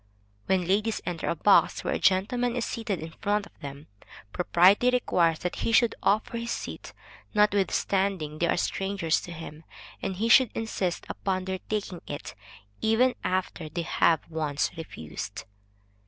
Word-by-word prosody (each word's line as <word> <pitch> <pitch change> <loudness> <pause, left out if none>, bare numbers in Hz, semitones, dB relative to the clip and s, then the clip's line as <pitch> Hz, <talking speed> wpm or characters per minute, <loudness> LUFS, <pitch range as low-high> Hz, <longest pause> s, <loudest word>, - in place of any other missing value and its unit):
When 185 -2 +2
ladies 210 +4 +1
enter 175 -2 -3
a - - 0
box 195 +5 +4
where - - -1
a - - -1
gentleman 235 +6 +2
is 245 - -1
seated 225 -5 -3
in 160 +1 -7
front 205 0 +1
of - - -20
them, 140 +1 -8 0.5
propriety 185 +7 +4
requires 175 -10 +2
that 180 - -4
he - - -1
should 230 0 +4
offer 215 +3 +1
his 235 0 -5
seat, - - -5 0.4
notwithstanding 195 -5 +1
they 170 - +2
are - - +1
strangers 195 -3 0
to 175 - -9
him, 160 -1 -9 0.4
and 195 -1 -2
he 220 +5 -1
should 250 +1 +7
insist 195 -6 -2
upon 185 -1 -2
their 190 0 -3
taking 200 -5 -3
it, - - -6 0.5
even 230 +4 +3
after 180 -3 -2
they 170 +2 -3
have 165 -1 +2
once 155 -3 -1
refused. 115 - -7
190 Hz, 155 wpm, -27 LUFS, 170-215 Hz, 0.5 s, should